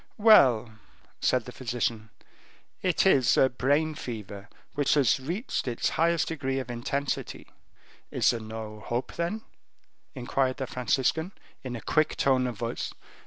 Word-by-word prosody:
"Well," 125 - +5 0.4
said 125 -3 +1
the 125 - -8
physician, 115 -3 -3 0.7
"it 185 0 +1
is 135 -10 +4
a 130 - +5
brain 145 +5 +1
fever, 105 -7 -7 0.2
which 145 0 +2
has 140 -3 +3
reached 170 - -3
its 120 -2 0
highest 165 0 +1
degree 135 -4 -2
of 130 -2 -4
intensity." 135 +4 -3 0.6
"There - - -8
is - - +4
no 110 -1 -6
hope, 120 +4 -3
then?" 195 +6 -3 0.7
inquired 130 +1 0
the 135 - -3
Franciscan, 130 - 0 0.3
in 125 -2 -5
a 115 - -6
quick 155 +6 +1
tone 130 -2 +2
of 120 -4 -5
voice. 115 +2 -3
130 Hz, 140 wpm, -27 LUFS, 115-150 Hz, 0.7 s, Well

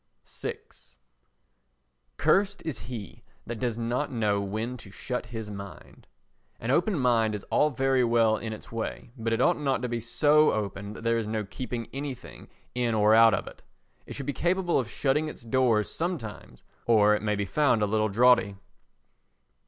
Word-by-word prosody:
vi - - -5 1.6
Cursed 200 0 +2
is 155 -10 -4
he 105 0 -8 0.2
that 120 -1 -5
does 120 -2 -1
not 120 +5 -1
know 105 -4 +1
when 110 +5 -3
to 115 - -13
shut 125 +5 -5
his 110 -2 -6
mind. 100 -1 -10 0.5
An 115 - -2
open 175 +6 +2
mind 115 -5 +2
is 105 - -6
all 150 - +4
very 135 -1 +1
well 115 -2 +3
in 110 +1 -5
its 110 - -9
way, 115 0 -5
but 115 -2 -3
it 115 - +1
ought 170 +5 +3
not 135 -4 0
to - - 0
be 120 -1 -2
so 150 +6 +4
open 100 -1 -4
that 115 - -10
there 115 0 +2
is 110 - -3
no 110 -1 -2
keeping 120 +2 -5
anything 135 -2 -7 0.3
in 120 -2 0
or 105 0 +4
out 115 0 +7
of - - -4
it. - - -12 0.5
It - - -7
should 140 - -5
be 145 - -2
capable 175 0 +1
of 120 -4 -3
shutting 145 +5 0
its 150 - -9
doors 115 -3 +2
sometimes, 160 - -5 0.2
or 105 -2 +5
it 105 - 0
may 105 0 0
be 100 0 -2
found 125 -1 +2
a - - +4
little 110 +1 +1
draughty. 120 -2 +4
115 Hz, 180 wpm, -27 LUFS, 110-135 Hz, 1.6 s, out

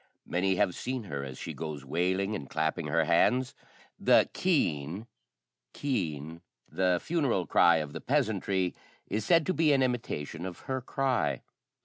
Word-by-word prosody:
Many 95 +2 +1
have 90 - +2
seen 130 +3 -4
her 70 -8 -5
as 65 -2 -7
she - - -6
goes 75 -3 -6
wailing 95 +7 0
and 75 -10 -5
clapping 80 -1 -1
her 80 +2 +2
hands. 125 +10 +2 0.5
The - - +5
keen 95 - 0 0.7
[caoine], 80 - -3 0.3
the 90 -2 +1
funeral 140 - 0
cry 85 +2 +5
of 75 -2 -2
the - - -6
peasantry, 95 -2 0 0.3
is 105 0 -2
said 165 +1 +4
to 185 - +1
be 160 -3 +3
an 135 -1 +3
imitation 115 - -3
of 90 -2 -9
her 130 -1 -3
cry. 125 - 0
90 Hz, 150 wpm, -29 LUFS, 80-130 Hz, 0.7 s, The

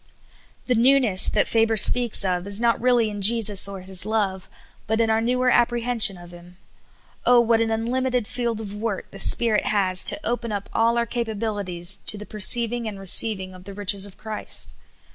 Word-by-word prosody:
' - - -30
' - - -36
The 250 - 0
newness 240 -5 +3
that - - 0
Faber 225 -1 0
speaks 235 -1 +5
of 180 0 -3
is 200 +1 +1
not 235 -1 0
really 240 -3 +1
in 205 -1 -7
Jesus 210 -2 +2
or 195 -1 -9
His 185 0 -5
love, 200 -3 -3 0.4
but 220 +2 -1
in 225 -1 +1
our 220 0 0
newer 250 +2 0
apprehension 240 -4 +1
of 175 0 -14
Him. 175 0 -16 0.7
Oh, 245 -1 +4
what 230 -1 +1
an 225 - -1
unlimited 245 +2 -2
field 235 -1 -4
of 205 -2 -8
work 210 -2 -6
the 195 - -11
Spirit 220 +1 +4
has 185 -3 +1
to - - +3
open 235 -1 -3
up 200 -1 -6
all 230 +1 +1
our 235 - 0
capabilities 205 -6 -4
to 210 - +5
the 210 - -9
perceiving 230 +3 0
and 205 -2 -8
receiving 190 0 +1
of 185 0 -15
the 200 0 -11
riches 200 0 0
of 195 - -14
Christ 215 0 -6
220 Hz, 195 wpm, -22 LUFS, 195-235 Hz, 0.7 s, speaks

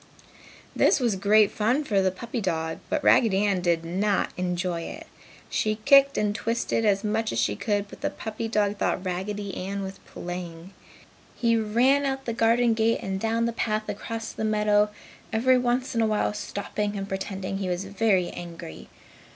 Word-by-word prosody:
This - - +4
was 235 -5 +1
great 205 +2 +4
fun 245 +8 +1
for 200 -8 +1
the 190 - +3
puppy 230 +6 -5
dog, 160 -4 -2
but 305 - -1
Raggedy 205 -3 +4
Ann 195 -3 +1
did 170 -2 +1
not 195 +4 0
enjoy 180 -1 -2
it. - - -7 0.4
She 215 0 0
kicked 275 0 +6
and 210 -1 +1
twisted 230 0 -1
as 200 -1 +2
much 220 +1 0
as - - -3
she 110 -3 +1
could, 205 - -1
but - - -13
the - - 0
puppy 220 +1 -5
dog 210 -2 0
thought 190 - -1
Raggedy 200 +3 -3 0.3
was 195 0 -6
playing. 175 0 -7 0.6
He 230 -1 +2
ran 240 +6 +3
out 270 0 -3
the 230 - -2
garden 230 +1 +3
gate 225 +1 +1
and 190 0 -2
down 225 +2 0
the 235 - -1
path 215 -1 -1
across 225 +2 -5
the - - -5
meadow, 210 -1 +3 0.4
every 255 +3 +3
once 250 +1 0
in 230 - +1
a 225 - +3
while 215 -1 0
stopping 205 0 -3
and 195 0 -4
pretending 190 0 -4
he 190 -2 -2
was 180 +2 -2
very 195 -2 +1
angry. 170 - -9
210 Hz, 175 wpm, -26 LUFS, 190-225 Hz, 0.6 s, kicked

